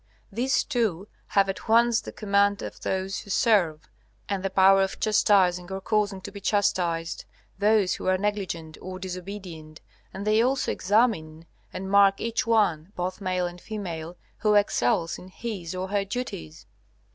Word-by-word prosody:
These 250 Hz, +6 st, +1 dB
two 210 Hz, -6 st, -1 dB, 0.2 s
have 200 Hz, -1 st, +3 dB
at 195 Hz, +3 st, -5 dB
once 235 Hz, +1 st, +4 dB
the -, -, -8 dB
command 200 Hz, -1 st, +1 dB
of -, -, -8 dB
those 190 Hz, 0 st, -2 dB
who -, -, -12 dB
serve, 185 Hz, -9 st, +2 dB, 0.4 s
and 200 Hz, -2 st, -2 dB
the 195 Hz, -, -1 dB
power 195 Hz, +1 st, +5 dB
of 190 Hz, 0 st, -2 dB
chastising, 190 Hz, -4 st, +3 dB
or 190 Hz, -, -3 dB
causing 200 Hz, -1 st, 0 dB
to 200 Hz, -, -8 dB
be 200 Hz, 0 st, -9 dB
chastised, 175 Hz, -5 st, 0 dB, 0.3 s
those 205 Hz, -2 st, +3 dB
who -, -, -5 dB
are 185 Hz, 0 st, +3 dB
negligent 185 Hz, -6 st, -3 dB
or 185 Hz, 0 st, -6 dB
disobedient; 180 Hz, -4 st, -8 dB, 0.3 s
and 195 Hz, +1 st, -6 dB
they 215 Hz, +1 st, +4 dB
also 260 Hz, +3 st, +1 dB
examine 185 Hz, -7 st, +1 dB, 0.3 s
and 190 Hz, +1 st, -6 dB
mark 200 Hz, -1 st, +5 dB
each 230 Hz, +1 st, -2 dB
one, 195 Hz, -7 st, +2 dB
both 185 Hz, +2 st, -4 dB
male 185 Hz, -1 st, 0 dB
and 175 Hz, 0 st, -7 dB
female, 175 Hz, -6 st, -6 dB, 0.2 s
who 210 Hz, -1 st, +3 dB
excels 165 Hz, -5 st, +1 dB
in 180 Hz, -, -12 dB
his 185 Hz, -4 st, -6 dB
or 185 Hz, +1 st, -4 dB
her 200 Hz, 0 st, +1 dB
duties. 195 Hz, -, -6 dB
195 Hz, 160 wpm, -26 LUFS, 180-210 Hz, 0.4 s, power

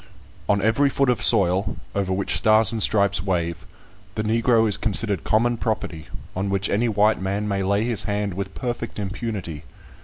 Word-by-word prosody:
On 100 Hz, -1 st, +2 dB
every 125 Hz, +6 st, +3 dB
foot 135 Hz, -1 st, +1 dB
of 120 Hz, -, -2 dB
soil, 95 Hz, +1 st, +3 dB, 0.2 s
over 100 Hz, -2 st, -2 dB
which 95 Hz, +1 st, -1 dB
Stars 110 Hz, +1 st, +4 dB
and 115 Hz, -2 st, -3 dB
Stripes 100 Hz, -5 st, +3 dB
wave, 85 Hz, -3 st, -2 dB, 0.5 s
the 110 Hz, -, -2 dB
Negro 115 Hz, +1 st, +2 dB
is 105 Hz, -, +2 dB
considered 105 Hz, -2 st, -1 dB
common 120 Hz, +2 st, +1 dB
property, 95 Hz, -8 st, -4 dB, 0.3 s
on 95 Hz, +2 st, -2 dB
which 100 Hz, 0 st, -1 dB
any 115 Hz, +4 st, +1 dB
white 105 Hz, -1 st, +2 dB
man 100 Hz, +2 st, -2 dB
may 100 Hz, -1 st, -1 dB
lay 100 Hz, +2 st, +1 dB
his 115 Hz, -3 st, -1 dB
hand 100 Hz, -1 st, -2 dB
with 100 Hz, +2 st, -6 dB
perfect 120 Hz, -2 st, -5 dB
impunity. 95 Hz, -6 st, -5 dB
105 Hz, 175 wpm, -22 LUFS, 95-115 Hz, 0.5 s, Stars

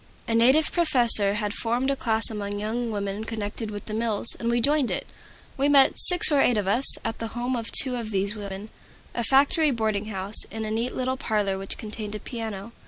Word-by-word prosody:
A 230 Hz, -, -2 dB
native 260 Hz, +7 st, +3 dB
professor 240 Hz, -, +3 dB
had 210 Hz, -1 st, -3 dB
formed 240 Hz, +5 st, -2 dB
a -, -, -1 dB
class 225 Hz, -3 st, 0 dB
among 205 Hz, -1 st, -5 dB
young 225 Hz, +3 st, -4 dB
women 200 Hz, 0 st, -5 dB
connected 220 Hz, 0 st, -6 dB
with 205 Hz, -1 st, -8 dB
the 215 Hz, -, -7 dB
mills, 225 Hz, 0 st, +5 dB
and 235 Hz, -, -3 dB
we 240 Hz, 0 st, 0 dB
joined 285 Hz, +1 st, +1 dB
it. -, -, -4 dB, 0.5 s
We 280 Hz, +2 st, 0 dB
met, 275 Hz, -2 st, +4 dB
six 355 Hz, -3 st, +6 dB
or 285 Hz, -2 st, +3 dB
eight 245 Hz, -, +2 dB
of 205 Hz, -, -2 dB
us, 240 Hz, +7 st, +5 dB
at 225 Hz, 0 st, -4 dB
the 225 Hz, +1 st, -7 dB
home 245 Hz, +2 st, -2 dB
of 230 Hz, -2 st, -6 dB
two 260 Hz, -2 st, +4 dB
of 230 Hz, -3 st, -6 dB
these 200 Hz, 0 st, -1 dB
young 210 Hz, -2 st, -9 dB
women, 200 Hz, +2 st, -8 dB, 0.4 s
a 235 Hz, -, -3 dB
factory 280 Hz, +5 st, +2 dB
boarding 220 Hz, -5 st, -2 dB
house, 200 Hz, 0 st, -2 dB
in 220 Hz, 0 st, -7 dB
a 215 Hz, -, -5 dB
neat 230 Hz, +3 st, -3 dB
little 260 Hz, 0 st, -3 dB
parlor 205 Hz, -6 st, -2 dB
which 195 Hz, -, -5 dB
contained 215 Hz, -1 st, -7 dB
a -, -, -6 dB
piano. 220 Hz, -3 st, -7 dB
225 Hz, 220 wpm, -24 LUFS, 210-250 Hz, 0.5 s, six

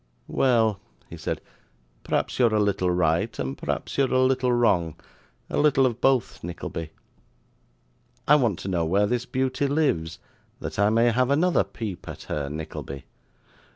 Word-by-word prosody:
'Well,' 115 Hz, -6 st, +2 dB, 0.3 s
he -, -, -6 dB
said, -, -, -4 dB, 0.6 s
'p'raps -, -, -1 dB
you're 115 Hz, -3 st, +4 dB
a -, -, +3 dB
little 100 Hz, -3 st, +1 dB
right, 90 Hz, +4 st, +1 dB
and 70 Hz, -2 st, -3 dB
p'raps -, -, -4 dB
you're 135 Hz, -2 st, +2 dB
a 130 Hz, -, +3 dB
little 130 Hz, -1 st, +2 dB
wrong 95 Hz, -10 st, +2 dB, 0.5 s
a -, -, -2 dB
little 145 Hz, -3 st, +4 dB
of 120 Hz, -2 st, -1 dB
both, 135 Hz, -3 st, +1 dB
Nickleby. 85 Hz, -1 st, -5 dB, 1.4 s
I 150 Hz, -, +6 dB
want 120 Hz, -, +3 dB
to -, -, -6 dB
know 90 Hz, -3 st, 0 dB
where 95 Hz, +6 st, +2 dB
this 120 Hz, +3 st, -1 dB
beauty 130 Hz, +2 st, 0 dB
lives, 110 Hz, -, 0 dB, 0.4 s
that -, -, -6 dB
I 100 Hz, 0 st, +4 dB
may 115 Hz, +2 st, +3 dB
have 125 Hz, +2 st, +1 dB
another 165 Hz, +6 st, +3 dB
peep 105 Hz, -7 st, -7 dB
at -, -, -8 dB
her, 70 Hz, -2 st, -3 dB
Nickleby. 75 Hz, -3 st, -7 dB
110 Hz, 155 wpm, -25 LUFS, 85-130 Hz, 1.4 s, I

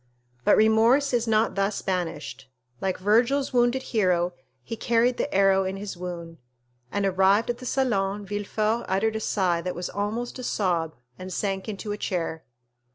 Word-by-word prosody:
But -, -, +5 dB
remorse 225 Hz, +6 st, +4 dB
is 235 Hz, -1 st, +1 dB
not 220 Hz, 0 st, +2 dB
thus 200 Hz, +1 st, -1 dB
banished; 165 Hz, -7 st, -3 dB, 0.3 s
like 190 Hz, -1 st, -1 dB
Virgil's 240 Hz, +8 st, +2 dB
wounded 245 Hz, +1 st, +2 dB
hero, 180 Hz, -4 st, +2 dB, 0.3 s
he 230 Hz, -, -5 dB
carried 235 Hz, +2 st, +2 dB
the 290 Hz, -, -2 dB
arrow 195 Hz, -5 st, +4 dB
in 190 Hz, +1 st, -3 dB
his 200 Hz, -1 st, -6 dB
wound, 170 Hz, -2 st, -7 dB, 0.5 s
and, 205 Hz, 0 st, 0 dB
arrived 195 Hz, +4 st, +3 dB
at 240 Hz, -, -8 dB
the 255 Hz, -, -7 dB
salon, 205 Hz, -7 st, 0 dB
Villefort 210 Hz, +3 st, -1 dB
uttered 215 Hz, +4 st, +1 dB
a -, -, -1 dB
sigh 185 Hz, -5 st, 0 dB
that 180 Hz, +1 st, -4 dB
was 175 Hz, 0 st, -4 dB
almost 220 Hz, +6 st, -3 dB
a -, -, -6 dB
sob, 170 Hz, -8 st, 0 dB, 0.2 s
and 185 Hz, 0 st, -7 dB
sank 195 Hz, +2 st, -2 dB
into 210 Hz, 0 st, -5 dB
a 205 Hz, -, -4 dB
chair. 165 Hz, -3 st, -3 dB
205 Hz, 165 wpm, -26 LUFS, 185-230 Hz, 0.5 s, But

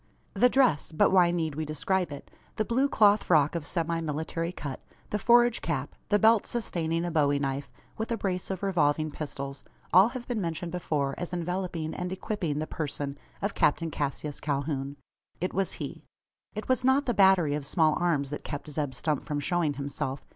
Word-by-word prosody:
The 250 Hz, -, +5 dB
dress 245 Hz, -, +3 dB
but 155 Hz, -, +3 dB
why 180 Hz, -2 st, +6 dB
need 165 Hz, -3 st, -1 dB
we 155 Hz, +2 st, -3 dB
describe 165 Hz, +3 st, -1 dB
it? 140 Hz, -, -9 dB, 0.2 s
The 215 Hz, -, 0 dB
blue 260 Hz, +5 st, +2 dB
cloth 210 Hz, -4 st, +5 dB
frock 150 Hz, -4 st, +4 dB
of 165 Hz, -4 st, -3 dB
semi 165 Hz, -1 st, -1 dB
military 160 Hz, +2 st, -3 dB
cut 145 Hz, -6 st, -6 dB, 0.3 s
the 210 Hz, -, 0 dB
forage 240 Hz, +2 st, +4 dB
cap 145 Hz, -4 st, -2 dB, 0.2 s
the 205 Hz, -, +5 dB
belt 220 Hz, +1 st, +4 dB
sustaining 170 Hz, -7 st, -1 dB
a 175 Hz, -, -2 dB
bowie 145 Hz, -3 st, +3 dB
knife, 140 Hz, -1 st, -2 dB, 0.3 s
with 220 Hz, +2 st, -3 dB
a 230 Hz, -, 0 dB
brace 185 Hz, -3 st, -2 dB
of 190 Hz, 0 st, -4 dB
revolving 155 Hz, -5 st, +1 dB
pistols 140 Hz, -2 st, -6 dB, 0.3 s
all 185 Hz, +4 st, +8 dB
have 245 Hz, 0 st, -7 dB
been 235 Hz, -4 st, -1 dB
mentioned 170 Hz, 0 st, -3 dB
before 150 Hz, -6 st, -1 dB
as 175 Hz, 0 st, -5 dB
enveloping 175 Hz, -2 st, -2 dB
and 180 Hz, 0 st, -4 dB
equipping 190 Hz, -5 st, -2 dB
the 155 Hz, -, -1 dB
person 145 Hz, -3 st, -4 dB, 0.3 s
of 200 Hz, -, 0 dB
Captain 165 Hz, +2 st, +1 dB
Cassius 145 Hz, 0 st, -3 dB
Calhoun. 140 Hz, -1 st, -2 dB, 0.4 s
It 180 Hz, -, -2 dB
was 195 Hz, -1 st, 0 dB
he. -, -, -6 dB, 0.5 s
It 215 Hz, -, -5 dB
was 255 Hz, -1 st, +1 dB
not 265 Hz, +2 st, +3 dB
the 245 Hz, -, +1 dB
batterie 190 Hz, -7 st, +5 dB
of 150 Hz, -, -3 dB
small 155 Hz, +2 st, +3 dB
arms 150 Hz, -6 st, +1 dB
that 145 Hz, -, -5 dB
kept 150 Hz, +1 st, -6 dB
Zeb 145 Hz, -3 st, -2 dB
Stump 150 Hz, 0 st, -1 dB
from 150 Hz, -2 st, -2 dB
showing 160 Hz, -1 st, 0 dB
himself. 140 Hz, -1 st, -4 dB
165 Hz, 190 wpm, -28 LUFS, 145-190 Hz, 0.5 s, all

